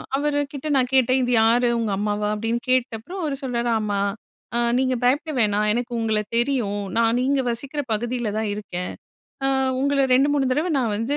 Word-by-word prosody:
அவருகிட்ட 290 Hz, 0 st, -2 dB
நான் 255 Hz, -2 st, +2 dB
கேட்டேன், 260 Hz, 0 st, +4 dB
"இது 245 Hz, -, 0 dB
யாரு, 235 Hz, +2 st, +4 dB
உங்க 225 Hz, -3 st, -1 dB
அம்மாவா?" 210 Hz, 0 st, -1 dB
அப்படின்னு 225 Hz, +2 st, -1 dB
கேட்டப்புறம் 255 Hz, -, -1 dB
அவரு 295 Hz, -4 st, -1 dB
சொல்றாரு, 240 Hz, -2 st, -1 dB
"ஆமா. 205 Hz, -2 st, -1 dB, 0.6 s
அ -, -, +2 dB, 0.2 s
நீங்க 255 Hz, 0 st, +1 dB
பயப்பட 290 Hz, +6 st, +2 dB
வேணா. 210 Hz, -2 st, +2 dB
எனக்கு 245 Hz, +1 st, -2 dB
உங்கள 220 Hz, -1 st, +1 dB, 0.2 s
தெரியும். 235 Hz, -6 st, 0 dB
நான் 230 Hz, +1 st, +3 dB
நீங்க 275 Hz, +1 st, +2 dB
வசிக்கிற 280 Hz, +5 st, -3 dB
பகுதியில 240 Hz, +1 st, -2 dB
தான் 220 Hz, -1 st, -1 dB
இருக்கேன். 180 Hz, -3 st, -5 dB, 0.5 s
அ -, -, +3 dB, 0.3 s
உங்கள 280 Hz, 0 st, +2 dB
2, 270 Hz, +3 st, +4 dB
3 270 Hz, -2 st, +1 dB
தடவை 310 Hz, +6 st, 0 dB
நான் 235 Hz, -5 st, 0 dB
வந்து, 235 Hz, +7 st, -1 dB
245 Hz, 170 wpm, -23 LUFS, 220-275 Hz, 0.6 s, கேட்டேன்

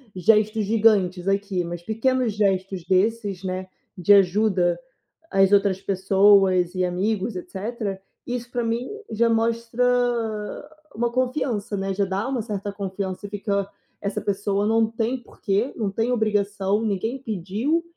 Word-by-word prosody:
gestos 215 Hz, +3 st, +3 dB
gigantes 200 Hz, -4 st, +2 dB
aqui, 195 Hz, -2 st, 0 dB
mas 170 Hz, 0 st, -6 dB
pequenos 230 Hz, +3 st, 0 dB
gestos 195 Hz, -3 st, 0 dB
desses, 195 Hz, 0 st, 0 dB
né, 185 Hz, 0 st, -3 dB, 0.3 s
de 180 Hz, +3 st, +5 dB
ajuda 190 Hz, -2 st, +3 dB, 0.5 s
às 195 Hz, 0 st, +4 dB
outras 195 Hz, -2 st, +3 dB
pessoas 190 Hz, -1 st, +4 dB
e 185 Hz, 0 st, +1 dB
amigos 190 Hz, +4 st, -1 dB
etcétera, 195 Hz, +2 st, -4 dB, 0.3 s
isso, 245 Hz, 0 st, -4 dB
pra 240 Hz, -1 st, -1 dB
mim, 230 Hz, +2 st, -1 dB, 0.2 s
já 230 Hz, +2 st, +2 dB
mostra 230 Hz, +1 st, 0 dB, 1.1 s
uma 235 Hz, +2 st, 0 dB
confiança, 250 Hz, -4 st, -1 dB
né, 195 Hz, 0 st, -2 dB
já 200 Hz, +1 st, +1 dB
dá 195 Hz, +5 st, -2 dB
uma 265 Hz, -3 st, -1 dB
certa 205 Hz, -2 st, -4 dB
confiança 195 Hz, -1 st, -5 dB
e -, -, -13 dB
fica: 200 Hz, -1 st, -1 dB, 0.3 s
“Essa 200 Hz, 0 st, -2 dB
pessoa 200 Hz, 0 st, -1 dB
não 225 Hz, 0 st, +3 dB
tem 230 Hz, +3 st, -1 dB
por -, -, -20 dB
que, 205 Hz, +6 st, 0 dB
não 215 Hz, -4 st, -1 dB
tem 225 Hz, +5 st, 0 dB
obrigação, 205 Hz, -2 st, 0 dB
ninguém 220 Hz, +5 st, -1 dB
pediu, 220 Hz, -, -1 dB
205 Hz, 140 wpm, -24 LUFS, 190-225 Hz, 1.1 s, de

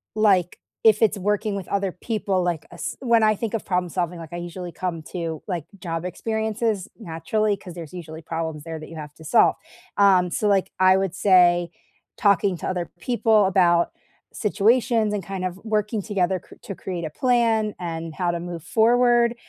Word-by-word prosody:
like, 195 Hz, -5 st, +3 dB, 0.3 s
if 215 Hz, 0 st, +6 dB
it's 215 Hz, -1 st, +3 dB
working 210 Hz, +1 st, 0 dB
with 190 Hz, -, -6 dB
other 200 Hz, -1 st, -1 dB
people, 195 Hz, -1 st, -2 dB
like 175 Hz, -3 st, -1 dB
a -, -, -11 dB
s -, -, -4 dB
when 235 Hz, -3 st, +3 dB
I 215 Hz, -1 st, +4 dB
think 225 Hz, +1 st, -4 dB
of 225 Hz, -, -3 dB
problem 180 Hz, -1 st, 0 dB
solving, 175 Hz, 0 st, -2 dB
like, 160 Hz, -2 st, -9 dB
I 175 Hz, -, -5 dB
usually 175 Hz, 0 st, -6 dB
come 170 Hz, -3 st, -4 dB
to, 165 Hz, -3 st, -4 dB
like, 175 Hz, -6 st, -3 dB
job 165 Hz, -1 st, -4 dB
experiences, 220 Hz, +1 st, -2 dB
naturally, 210 Hz, +2 st, -1 dB
'cause 180 Hz, -3 st, -10 dB
there's 165 Hz, -2 st, -9 dB
usually 160 Hz, -3 st, -8 dB
problems 160 Hz, -2 st, -4 dB
there 165 Hz, 0 st, -6 dB
that 155 Hz, -, -10 dB
you 165 Hz, -, -10 dB
have 150 Hz, -2 st, -8 dB
to 160 Hz, -, -14 dB
solve. -, -, +4 dB, 0.4 s
Um, 185 Hz, -3 st, +4 dB
so 210 Hz, -, 0 dB
like, 195 Hz, -2 st, +2 dB
I 185 Hz, 0 st, +6 dB
would 190 Hz, -2 st, 0 dB
say 175 Hz, -3 st, +4 dB, 0.5 s
talking 200 Hz, -2 st, +3 dB
to -, -, -5 dB
other 180 Hz, -2 st, -2 dB
people 225 Hz, -3 st, +3 dB
about 175 Hz, -2 st, +3 dB, 0.4 s
situations 225 Hz, 0 st, +2 dB
and 200 Hz, -, -2 dB
kind 190 Hz, 0 st, -5 dB
of 185 Hz, +1 st, -3 dB
working 215 Hz, 0 st, 0 dB
together 190 Hz, -3 st, 0 dB
cr -, -, -17 dB
to 195 Hz, -, -7 dB
create 180 Hz, -2 st, -5 dB
a 160 Hz, -, -3 dB
plan 225 Hz, -, +1 dB
and 165 Hz, -2 st, -5 dB
how 175 Hz, +1 st, 0 dB
to 170 Hz, -, -3 dB
move 170 Hz, -2 st, -6 dB
forward. 240 Hz, +3 st, +3 dB
185 Hz, 190 wpm, -23 LUFS, 170-215 Hz, 0.5 s, if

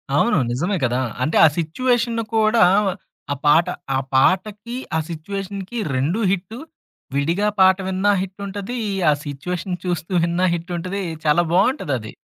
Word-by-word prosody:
అవును. 200 Hz, +6 st, +3 dB
నిజమే 175 Hz, +11 st, -1 dB
గదా! 125 Hz, +1 st, +1 dB, 0.2 s
అంటే 155 Hz, -, +1 dB
ఆ -, -, +9 dB
సిచ్యుయేషను 230 Hz, +7 st, 0 dB
కూడా 220 Hz, 0 st, +4 dB, 0.7 s
ఆ -, -, -4 dB
పాట, 150 Hz, +3 st, +5 dB, 0.3 s
ఆ -, -, +2 dB, 0.2 s
పాటకి 205 Hz, -, +1 dB, 0.2 s
ఆ -, -, +2 dB
సిచ్యుయేషన్‌కి 195 Hz, +5 st, -5 dB, 0.2 s
రెండు 155 Hz, -, 0 dB
హిట్టు. 200 Hz, +6 st, -3 dB, 0.6 s
విడిగా 170 Hz, +9 st, +1 dB
పాట 190 Hz, 0 st, +6 dB
విన్నా 190 Hz, +2 st, +2 dB
హిట్టుంటది. 200 Hz, +4 st, -5 dB, 0.3 s
ఆ -, -, +6 dB
సిచ్యుయేషన్ 175 Hz, +6 st, -4 dB
చూస్తూ 175 Hz, 0 st, -3 dB
విన్నా 170 Hz, +2 st, +1 dB
హిట్టుంటది. 180 Hz, +3 st, -4 dB, 0.2 s
చాలా 155 Hz, +3 st, +4 dB
బావుంటదది. 175 Hz, -, +1 dB
185 Hz, 125 wpm, -21 LUFS, 165-205 Hz, 0.7 s, ఆ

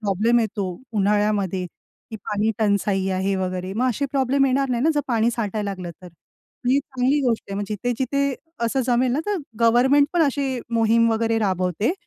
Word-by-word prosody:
Problem 215 Hz, +3 st, +2 dB
येतो 205 Hz, -3 st, -2 dB, 0.2 s
उन्हाळ्यामध्ये, 205 Hz, -2 st, +1 dB
ती 220 Hz, +5 st, -14 dB
पाणीटंचाई 205 Hz, -2 st, 0 dB
आहे 190 Hz, +1 st, 0 dB
वगैरे, 185 Hz, 0 st, -3 dB
मग 250 Hz, +5 st, +1 dB
असे 280 Hz, +4 st, -1 dB
प्रॉब्लेम 275 Hz, 0 st, +2 dB
येणार 270 Hz, +1 st, +1 dB
नाहीत 245 Hz, +3 st, 0 dB
ना? 320 Hz, -, +4 dB
जर 295 Hz, -, +2 dB
पाणी 230 Hz, -1 st, +2 dB
साठायला 210 Hz, -3 st, -2 dB
लागलं 185 Hz, -3 st, -6 dB
तर. 180 Hz, -, -10 dB, 0.6 s
ही 270 Hz, +2 st, +4 dB
चांगली 270 Hz, +1 st, 0 dB
गोष्ट 230 Hz, -, -1 dB
आहे. 195 Hz, -, -3 dB
मग 205 Hz, -, -2 dB
जिथे-जिथे 255 Hz, +5 st, -1 dB, 0.3 s
असं 265 Hz, +4 st, 0 dB
जमेल 250 Hz, 0 st, +2 dB
ना, 285 Hz, -, 0 dB
तर 415 Hz, -1 st, 0 dB, 0.2 s
गव्हर्नमेंट 260 Hz, +5 st, +4 dB
पण 350 Hz, -2 st, +3 dB
अशी 275 Hz, -3 st, 0 dB
मोहीम 230 Hz, 0 st, +3 dB
वगैरे 225 Hz, 0 st, +1 dB
राबवते, 185 Hz, -, 0 dB
225 Hz, 170 wpm, -22 LUFS, 200-260 Hz, 0.6 s, ना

